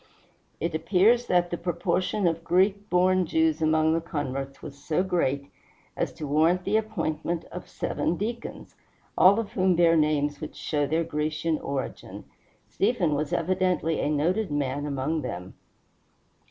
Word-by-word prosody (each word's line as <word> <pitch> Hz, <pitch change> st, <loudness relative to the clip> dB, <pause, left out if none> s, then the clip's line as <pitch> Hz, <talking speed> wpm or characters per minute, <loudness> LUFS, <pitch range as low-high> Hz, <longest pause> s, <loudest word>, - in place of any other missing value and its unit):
It 170 Hz, 0 st, -2 dB
appears 195 Hz, +9 st, +3 dB
that 175 Hz, -1 st, +2 dB
the 175 Hz, -, -3 dB
proportion 180 Hz, +3 st, -1 dB
of 165 Hz, -1 st, 0 dB
Greek 195 Hz, +4 st, +1 dB
born 185 Hz, 0 st, +3 dB
Jews 160 Hz, -1 st, +1 dB
among 155 Hz, 0 st, +3 dB
the 165 Hz, -, 0 dB
converts 135 Hz, -4 st, -4 dB
was 140 Hz, -, -8 dB
so 160 Hz, +4 st, +1 dB
great 140 Hz, -7 st, -1 dB, 0.4 s
as -, -, -1 dB
to 150 Hz, -, -6 dB
warrant 160 Hz, +5 st, +2 dB
the 200 Hz, +3 st, 0 dB
appointment 175 Hz, -6 st, -2 dB
of -, -, -8 dB
seven 170 Hz, -, -2 dB
deacons, 230 Hz, +3 st, -5 dB, 0.4 s
all 195 Hz, +4 st, +6 dB
of 225 Hz, -, -4 dB
whom 185 Hz, -1 st, +2 dB
bear 165 Hz, -1 st, +4 dB
names 150 Hz, -2 st, +1 dB
which 155 Hz, -, -7 dB
show 145 Hz, -2 st, -1 dB
their 160 Hz, +3 st, +1 dB
Grecian 155 Hz, +1 st, -1 dB
origin. 140 Hz, -1 st, -5 dB, 0.4 s
Stephen 195 Hz, -7 st, +1 dB
was 145 Hz, 0 st, -2 dB
evidently 180 Hz, -2 st, 0 dB
a 145 Hz, -, 0 dB
noted 175 Hz, +8 st, 0 dB
man 145 Hz, 0 st, -2 dB
among 145 Hz, +3 st, -1 dB
them. 90 Hz, -8 st, -6 dB
165 Hz, 150 wpm, -26 LUFS, 150-185 Hz, 0.4 s, all